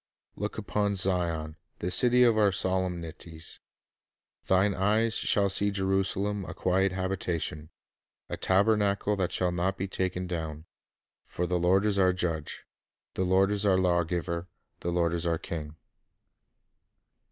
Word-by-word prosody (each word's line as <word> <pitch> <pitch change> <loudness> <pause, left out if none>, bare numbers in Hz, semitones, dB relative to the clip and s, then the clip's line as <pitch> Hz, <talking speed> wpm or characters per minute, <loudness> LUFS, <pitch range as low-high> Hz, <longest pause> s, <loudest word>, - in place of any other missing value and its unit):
'" - - -66
"Look - - -4
upon 100 -1 -1
Zion, 85 -4 0 0.2
the 90 - -3
city 125 +6 +5
of 120 -2 +4
our 105 -2 +4
solemnities; 90 -4 -3 0.9
thine 95 +2 +3
eyes 110 +4 +1
shall 100 -2 +3
see 100 +1 +3
Jerusalem 95 +1 0
a - - -8
quiet 95 +1 +1
habitation, 90 -5 -3 0.6
a - - -4
tabernacle 100 +1 +2
that 95 -2 -1
shall 90 -1 0
not 90 +2 -1
be 95 - -3
taken 95 -1 -2
down.... 80 -3 -5 0.6
For 90 - -3
the 90 0 0
Lord 95 +4 +3
is 100 -2 +1
our 95 -1 +4
judge, 85 -4 -3 0.5
the 95 - -1
Lord 95 +2 +3
is 105 0 0
our 95 -2 +3
lawgiver, 85 -1 0 0.3
the 85 - -3
Lord 85 -1 +1
is 85 0 -1
our 85 -1 +1
king." 80 -2 -6
95 Hz, 140 wpm, -28 LUFS, 85-100 Hz, 0.9 s, city